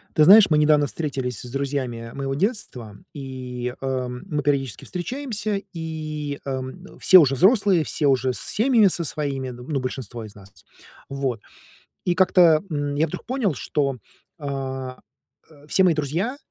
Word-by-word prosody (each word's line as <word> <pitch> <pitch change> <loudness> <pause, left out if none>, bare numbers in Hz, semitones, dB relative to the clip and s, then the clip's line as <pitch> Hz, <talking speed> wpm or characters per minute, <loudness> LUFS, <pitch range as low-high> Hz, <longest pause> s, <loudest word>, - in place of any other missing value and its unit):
Ты 155 - +5
знаешь, 200 +4 +8
мы 155 - +3
недавно 150 -1 +4
встретились 130 -8 -4
с 125 - -9
друзьями 130 -4 -3
моего 135 -1 -3
детства, 135 - -3 0.2
и, 125 -3 -6
э, 130 -1 -2
мы 125 +4 -4
периодически 135 -4 -1
встречаемся, 210 0 -3
и, 155 -3 -5
эм, 135 +7 -6
все 185 - +8
уже 135 -5 +3
взрослые, 195 - +4
все 150 -1 -1
уже 130 -1 +2
с - - -8
семьями 225 -1 +3
со 175 -2 0
своими, 140 -3 -3
ну, 125 +4 -4
большинство 120 -3 -5
из 105 - -12
нас. 100 -1 -15 0.6
Вот. 135 -5 -2 0.6
И 175 - +1
как-то, 175 -4 +5
м, 145 -2 -2
я 155 +3 +2
вдруг - - -7
понял, 245 - 0
что, 140 -1 -1 0.4
а, 135 -3 -5 0.5
э, 145 -1 -18
все 190 - +3
мои 180 -2 +5
друзья, 165 - -2
145 Hz, 155 wpm, -23 LUFS, 130-175 Hz, 0.6 s, знаешь